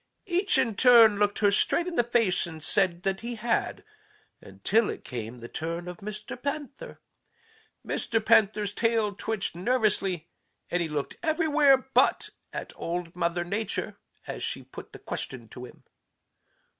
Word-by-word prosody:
Each 375 +1 +3
in 225 - +2
turn 230 -5 +7
looked 205 0 +2
her 200 - +5
straight 335 +10 +2
in 360 - -4
the 240 - +3
face 230 -7 +1
and 160 -2 -10
said 180 0 0
that 190 0 -1
he 235 +1 -5
had 230 +1 -1 0.6
until 225 0 0
it - - -6
came 120 -2 -6
the 120 0 -9
turn 170 +5 -4
of 180 -1 -7
Mr. 215 +4 -7
Panther. 285 0 -5 0.9
Mr. 225 - -1
Panther's 205 -1 +3
tail 225 -2 +1
twitched 200 -3 -3
nervously, 195 -5 0 0.4
and 175 - +1
he 165 - -2
looked 150 -2 -4
everywhere 310 -4 +4
but 265 0 +1 0.2
at - - -6
Old 170 0 -4
Mother 175 0 0
Nature 205 +5 -3 0.3
as - - -6
she - - -3
put - - -11
the - - -10
question 120 -4 -6
to 125 +2 -9
him. - - -16
205 Hz, 155 wpm, -27 LUFS, 175-240 Hz, 0.9 s, turn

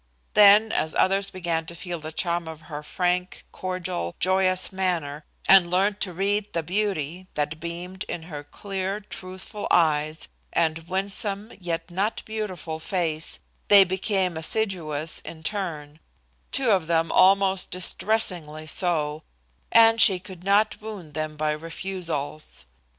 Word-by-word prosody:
Then, 210 +2 +7
as 155 - -1
others 195 +1 +2
began 170 -3 -2
to 170 - -7
feel 175 0 -5
the 155 0 -7
charm 170 +1 -1
of 160 -1 -8
her 150 -2 -7
frank, 180 +3 -1
cordial, 185 - -4
joyous 185 +1 +2
manner, 170 -6 -1 0.2
and 190 -3 +8
learned 195 +3 +1
to 185 - 0
read 200 +3 -1
the 165 - -1
beauty 185 -2 -2
that 150 +1 -2
beamed 175 +3 -5
in 165 - -5
her 150 -3 -7
clear, 195 +4 -4
truthful 190 +1 -7
eyes 155 -2 +2 0.3
and 165 0 0
winsome, 200 +3 -2
yet 165 -1 -3
not 200 +5 -1
beautiful 185 -8 -4
face, 160 -3 -2 0.3
they 200 -1 +9
became 190 -1 0
assiduous 160 -4 -1
in 160 -1 -10
turn, 155 -6 -4 0.5
two 255 -4 +2
of 185 -5 +2
them 165 -1 +1
almost 195 0 +4
distressingly 180 -5 -1
so, 155 -3 0 0.5
and 225 0 +6
she 190 - +7
could 185 -1 -11
not 205 +3 +2
wound 200 -8 -8
them 155 0 -3
by 155 0 +1
refusals. 160 - -4
180 Hz, 135 wpm, -25 LUFS, 160-195 Hz, 0.5 s, they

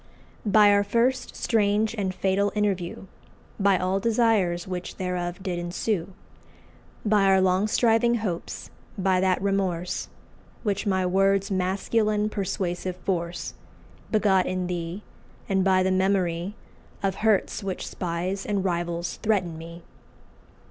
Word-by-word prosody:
"By 205 0 +6
our 200 0 +4
first 235 +5 0
strange 215 -1 +1
and 200 -4 -1
fatal 195 +2 +1
interview, 195 -4 -1 0.5
By 200 -1 +4
all 185 +2 0
desires 210 -6 +2
which 180 -1 -5
thereof 180 0 -3
did 180 -3 -2
ensue, 175 +1 -2 0.9
By 210 -2 +4
our 190 0 +5
long 190 +2 +3
striving 235 +1 +3
hopes, 200 -7 -4 0.3
by 190 -1 +2
that 185 -1 +2
remorse 190 -3 -1 0.5
Which 205 -2 -1
my 190 -2 +1
words' 195 +2 +2
masculine 210 +3 +1
persuasive 185 -2 -2
force 175 -2 -3 0.6
Begot 200 -4 +3
in 185 0 -1
thee, 175 +2 -4 0.4
and 190 -2 +2
by 185 -1 +4
the 190 - +1
memory 185 0 +1 0.5
Of 195 -1 0
hurts 215 -1 +2
which 190 -2 -4
spies 180 +3 -3
and 200 -2 -1
rivals 170 -1 -2
threaten 190 -6 +1
me!" 165 +1 -10
190 Hz, 125 wpm, -26 LUFS, 180-205 Hz, 0.9 s, By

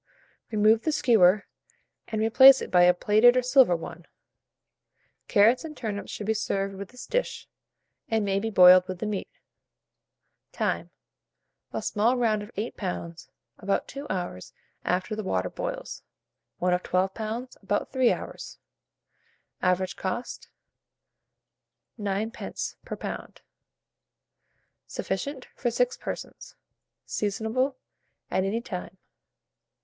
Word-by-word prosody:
Remove 215 +1 +4
the 315 - 0
skewer, 215 - +4 0.6
and 215 -1 -2
replace 260 +4 +8
it - - -6
by 180 - +5
a 180 - +6
plated 215 +7 +5
or 255 - +2
silver 250 -7 +5
one. 165 +1 -8 1.2
Carrots 225 +7 +4
and 310 -2 -8
turnips 210 -4 -4
should 210 - -5
be 220 - +1
served 195 -2 -2
with 195 0 -8
this 250 0 -10
dish, - - -2 0.6
and 220 -2 +1
may 195 0 +1
be 225 +2 -2
boiled 185 -2 +7
with 185 -1 -5
the 200 - -4
meat. 210 -2 -3 1.2
Time. - - -2 0.8
A - - -4
small 230 +4 +1
round 220 -3 +1
of 205 - -9
8 215 +4 -4
lbs., 170 -7 -5 0.3
about 195 +1 -1
2 280 +1 -8
hours 175 - -4 0.3
after 185 +4 -1
the 215 - -3
water 90 - -1
boils; - - -5 0.6
one 180 0 +1
of 180 - +1
12 185 +1 0
lbs., 230 +3 -5
about 205 +1 -2
3 255 -2 +3
hours. - - -6 1.0
Average 185 0 0
cost, 195 +6 -5 1.5
9d. 205 +2 -3
per - - -6
lb. - - -7 1.5
Sufficient 260 +8 -4
for 245 - -1
6 - - +1
persons. - - -7 0.5
Seasonable 220 +6 -1 0.6
at 190 - +1
any 210 +4 -1
time. 190 -4 -7
210 Hz, 125 wpm, -27 LUFS, 185-240 Hz, 1.5 s, replace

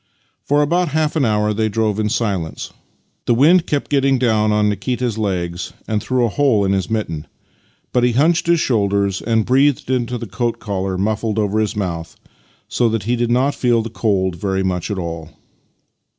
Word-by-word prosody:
For 145 +1 +2
about 175 +4 +1
half 155 +1 0
an 150 -4 +2
hour 105 -1 +1
they 110 +1 0
drove 110 -1 0
in 105 0 0
silence. 100 -8 -2 0.5
The 120 - +3
wind 160 +7 +4
kept 145 -2 -2
getting 135 -1 +3
down 110 -4 +2 0.2
Nikita's 115 +3 -1
legs 90 -4 -3
and 105 -1 -1
through 125 +1 +1
a - - 0
hole 115 -4 +2
in 95 - +1
his 95 +1 -1
mitten, 85 -9 -3 0.7
but 125 - +2
he 120 -1 +3
hunched 160 +7 +2
his 170 -1 +4
shoulders 100 -6 0
and 115 -1 +1
breathed 135 +1 +2
into 125 -1 -1
the 115 - -6
coat 115 +3 -2
collar 95 -2 -3
muffled 110 +2 -1
over 105 0 0
his 110 +1 -1
mouth, 85 -5 -4 0.5
so 120 -2 +1
that 110 -1 -2
he 120 +4 0
did 120 0 -1
not 130 +4 +2
feel 120 -4 +1
the 115 - -7
cold 95 -6 0
very 95 +1 -1
much 90 -2 -2
after 100 -2 -2
all. 85 -2 -6
110 Hz, 185 wpm, -19 LUFS, 100-125 Hz, 0.7 s, wind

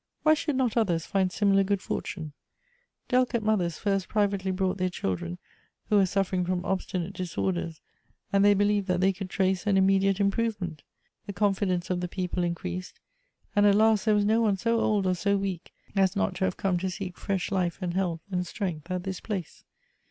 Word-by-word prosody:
Why 310 - +6
should 300 -2 -1
not 255 -4 +1
others 175 -8 +1
find 190 -2 +1
similar 195 0 +3
good 200 0 0
fortune? 160 -5 -5 0.7
Del 255 0 +4
icate 235 -2 -2
mothers 185 -7 +1
first 195 -2 0
privately 200 -3 0
brought 190 0 -1
their 185 0 +1
children 90 - -3 0.5
who 210 - +4
were 195 -2 +4
suffering 190 -1 0
fi"om 180 0 -2
obstinate 185 -1 -2
disorders, 175 -3 -3 0.5
and 195 0 +4
they 205 0 +6
believed 205 0 +2
that 180 -1 +1
they 190 +1 +3
could 190 0 -6
trace 190 +1 0
an 200 -2 +4
immediate 195 0 +3
improvement. 200 -6 -1 0.5
The 200 - -4
confidence 190 -2 0
of 180 - 0
the 180 - -2
people 180 -1 -2
increased, 180 +1 -4 0.6
and 205 0 +5
at 200 - +5
last 220 0 +4
there 215 -1 +4
was 205 0 +2
no 220 +2 +3
one 210 -4 +2
so 230 +3 +1
old 210 -3 +1
or 185 - +2
so 200 +3 +1
weak 195 -3 -4 0.2
as 190 0 +3
not 205 -1 0
to 190 - +1
have 185 - -2
come 185 -3 0
to 190 +1 -2
seek 185 0 -5
fresh 195 -3 -2
life 180 -3 0
and 180 -3 -3
health 175 -3 -1
and 180 -1 -1
strength 175 -5 -4
at 180 -1 -2
this 190 -1 -4
place. 190 -7 -5
190 Hz, 195 wpm, -27 LUFS, 180-205 Hz, 0.7 s, Why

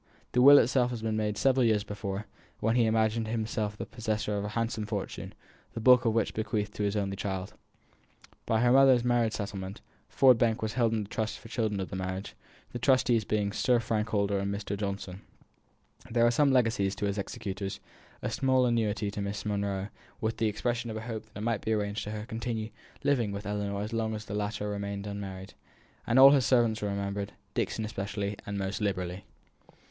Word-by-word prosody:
The 125 - +3
will 140 +2 +10
itself 125 0 +3
had 120 -3 -5
been 110 -1 0
made 105 -1 -1
several 135 -1 +3
years 110 -3 +3
before, 100 0 -5 0.3
when 115 +2 +1
he 120 -2 +4
imagined 110 0 +1
himself 110 -2 -2
the - - -4
possessor 110 -2 -2
of 100 - -2
a 105 - -3
handsome 115 -2 -1
fortune, - - -4 0.4
the - - -4
bulk 125 +1 +6
of 115 - +3
which 115 - +2
he - - -12
bequeathed 105 -1 -2
to - - -5
his 100 0 0
only 100 -2 -1
child. 95 -1 -4 0.9
By 110 0 +2
her 120 0 +4
mother's 130 -2 +6
marriage 120 -2 +2
settlement, 100 -2 -5 0.3
Ford 130 -3 +5
Bank 115 -2 +1
was 110 0 -2
held 115 -2 +2
in 105 -2 -1
trust 110 +1 -3
for - - -18
the - - -15
children 110 -4 -1
of 95 - -4
the - - -4
marriage; 95 +1 -4 0.4
the 120 - -5
trustees 125 -4 +3
being 105 -1 0
Sir 120 +3 +2
Frank 110 -1 -1
Holster 100 -2 +1
and 100 0 -2
Mr. 100 0 -3
Johnson. 100 -2 -4 0.9
There 115 0 +3
were 120 +5 +3
legacies 115 -7 +2
to 105 - -2
his 100 +1 -1
executors; 100 -1 -4 0.4
a - - -1
small 130 -1 +2
annuity 110 -3 0
to 100 - -4
Miss 100 +1 -4
Monro, 100 -1 -2 0.3
with 110 0 -2
the 115 - +1
expression 120 +3 -2
of 110 - -4
a - - -5
hope 110 -1 -5
that 110 - -13
it - - -5
might 115 -2 0
be 110 - 0
arranged 105 0 -1
for - - -5
her 105 0 -4
to - - -7
continue 110 -1 -4 0.3
living 125 -7 +2
with 100 0 -6
Ellinor 100 0 -2
as 110 - -5
long 110 -1 -1
as 105 0 -7
the 100 - -7
latter 105 0 -2
remained 100 -1 -4
unmarried; 95 -2 -6 0.5
all 130 +3 +8
his 135 -3 +3
servants 115 -4 +3
were 105 - -1
remembered, 100 0 -3 0.2
Dixon 110 - -1
especially, 100 -1 -3
and 100 0 -3
most 95 +1 -3
liberally. 95 -2 -2
110 Hz, 205 wpm, -29 LUFS, 100-115 Hz, 0.9 s, will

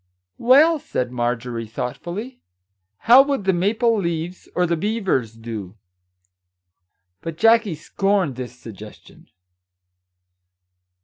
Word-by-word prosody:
"Well, 295 +7 +5
said 125 - -3
Marjorie, 120 -1 -3
thoughtfully, 175 - -6 0.6
"how 245 +3 +9
would 275 -5 -1
The 190 0 +2
Maple 220 +6 +1
leaves, 170 0 -4
or 180 - +2
The 170 0 0
Beavers, 185 - -1
do?" 110 -4 -7 1.5
But 165 -1 -6
Jackie 225 -3 +4
scorned 190 -1 -1
this 125 0 -7
suggestion. 110 -3 -13
170 Hz, 100 wpm, -21 LUFS, -, 1.5 s, how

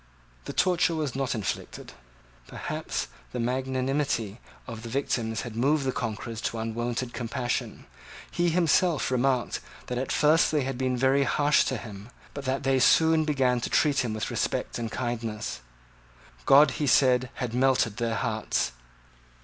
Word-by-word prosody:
The - - -5
torture 180 -2 +2
was 150 -6 -2
not 135 -2 -1
inflicted. 105 -4 -5 0.5
Perhaps - - -4 0.3
the - - -3
magnanimity 130 -2 -1 0.3
of 115 -2 -7
the 115 - -7
victim 115 -3 -1
had 110 0 -5
moved 140 +4 +2
the 130 - +1
conquerors 115 -1 -4
to 115 - -3
unwonted 120 +2 -3
compassion. 120 +1 -3 0.5
He 175 0 +1
himself 170 -3 +2
remarked 130 -1 +1 0.3
that 125 0 -3
at 130 - -3
first 155 +2 +4
they 150 -3 +1
had 135 0 -3
been 130 0 -1
very 135 +2 +3
harsh 145 +1 +3
to 130 - -1
him, 105 0 -9 0.2
but 140 -1 -7
that 135 +1 -1
they 135 0 +2
soon 160 +4 +4
began 130 -5 +1
to - - -3
treat 145 -3 +2
him 115 -4 -1
with 110 - -3
respect - - -2
and 115 -2 -4
kindness. 115 - -4 0.9
God, 140 0 +7
he 145 - +1
said, 130 -2 +4
had 125 -3 -4
melted 125 -4 +2
their 115 -2 -1
hearts. 110 - -1
130 Hz, 155 wpm, -27 LUFS, 115-140 Hz, 0.9 s, God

